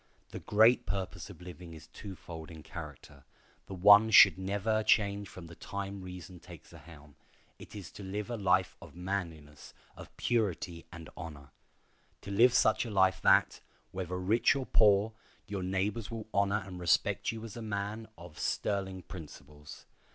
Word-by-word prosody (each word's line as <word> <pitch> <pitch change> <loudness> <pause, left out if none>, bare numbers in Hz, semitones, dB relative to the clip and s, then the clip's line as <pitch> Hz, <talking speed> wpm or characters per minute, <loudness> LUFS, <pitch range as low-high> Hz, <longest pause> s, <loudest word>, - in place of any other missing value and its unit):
The - - -7
great 110 +4 +4
purpose 95 -2 -4
of - - -12
living 90 -1 -10
is 80 0 -12
twofold 85 -4 -10
in 80 -2 -11
character. 70 -2 -10 0.4
The 95 - -7
one 105 +4 +7
should 95 -5 +8
never 100 +3 -1
change 100 -2 +1
from 95 - -11
the 85 - -12
time 100 +2 -6
reason 90 -1 -9
takes 85 -3 -14
the - - -13
helm; 75 -3 -15 0.5
it - - -12
is 100 -5 -8
to 100 - -10
live 105 +4 -5
a - - -2
life 95 -3 +1
of - - -13
manliness, 85 -5 -6 0.2
of - - -11
purity 90 -7 -1
and 85 -2 -10
honor. 70 -4 -9 0.7
To 100 - -8
live 120 +5 +5
such 110 - +3
a 120 - -6
life 95 -2 +2
that, - - +4 0.3
whether 90 -1 -4
rich 105 +9 +2
or 135 -2 -3
poor, 105 -1 +4 0.3
your 100 -3 -5
neighbors 95 +4 -2
will 115 -2 -6
honor 100 +1 +1
and 90 -2 -9
respect 90 -1 +1
you 115 -1 -8
as 115 -3 -8
a 120 - -7
man 105 +1 -4
of 85 -3 -12
sterling 95 -2 -2
principles. 75 -3 -12
95 Hz, 165 wpm, -31 LUFS, 85-105 Hz, 0.7 s, should